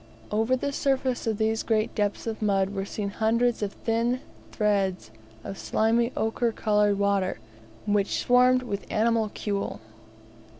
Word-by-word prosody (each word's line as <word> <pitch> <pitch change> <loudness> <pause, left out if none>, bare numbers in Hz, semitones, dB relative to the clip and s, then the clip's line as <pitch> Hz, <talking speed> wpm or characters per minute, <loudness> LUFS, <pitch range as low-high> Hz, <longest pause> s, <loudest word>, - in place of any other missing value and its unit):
Over 220 +4 +2
the 280 +2 -2
surface 265 -3 0
of 220 -2 0
these 220 +1 +1
great 220 -1 0
depths 205 -1 -1
of 225 -1 -4
mud 195 -2 +1
were 195 -1 -3
seen 200 0 -4
hundreds 230 +3 +1
of 205 -1 -2
thin 235 +2 0 0.3
threads 195 - 0 0.3
of 195 - -7
slimy 230 +2 +1
ochre 230 +2 0
coloured 210 -2 +2
water, 200 -2 +1 0.5
which 205 -1 +1
swarmed 250 +1 +4
with 205 -5 -5
animalculae. 215 -2 0
220 Hz, 135 wpm, -26 LUFS, 205-235 Hz, 0.5 s, swarmed